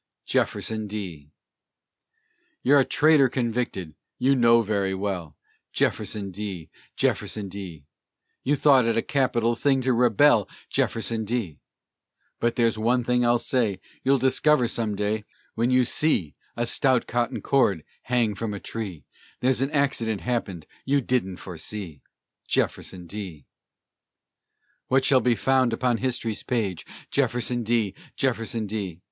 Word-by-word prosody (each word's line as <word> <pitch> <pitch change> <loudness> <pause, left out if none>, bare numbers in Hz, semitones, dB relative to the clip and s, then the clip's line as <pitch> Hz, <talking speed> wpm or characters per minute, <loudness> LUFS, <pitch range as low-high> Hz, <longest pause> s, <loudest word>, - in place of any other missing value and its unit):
JEFFERSON 110 -1 -1
D. 90 -9 -6 1.3
You're 140 +2 +5
a 135 - +3
traitor 150 -3 +4
convicted, 115 - -2 0.2
you 135 +2 +3
know 115 -2 +5
very 100 -2 0
well! 95 -5 -4 0.4
Jefferson 100 -2 -1
D., 95 -4 -6 0.2
Jefferson 105 -2 -1
D.! 90 -7 -8 0.6
You 145 - +2
thought 135 -4 +5
it 115 0 +1
a 115 - +1
capital 120 -4 +1
thing 135 +3 +2
to 130 0 +1
rebel, 120 -1 +4 0.2
Jefferson 115 0 0
D.! 110 -8 -3 0.8
But 120 0 0
there's 115 -2 +2
one 120 +3 +2
thing 125 +1 +1
I'll 120 0 +4
say: 115 -7 0 0.2
You'll 135 +1 +4
discover 130 +1 +3
some 110 -3 -1
day, 105 +1 -1 0.3
When 115 +2 0
you 125 -1 +4
see 115 - +1 0.2
a 120 - 0
stout 130 0 +2
cotton 120 0 -1
cord 100 - +2 0.2
hang 120 -3 +2
from 105 +1 -4
a - - -6
tree, 95 -11 -6 0.3
There's 130 0 +1
an 135 - +1
accident 135 -8 0
happened 100 -10 -3 0.2
you 140 +1 +2
didn't 115 -8 -1
foresee, 90 -3 -7 0.5
Jefferson 90 -2 -1
D.! 90 -6 -7 1.4
What 130 0 +3
shall 130 -2 +5
be 125 -1 +2
found 130 +2 +2
upon 120 0 +1
history's 120 -4 -2
page? 105 -8 -2 0.2
Jefferson 120 0 0
D., 115 -3 0 0.2
Jefferson 115 -3 -1
D.! 100 -5 -4
115 Hz, 135 wpm, -25 LUFS, 100-125 Hz, 1.4 s, You're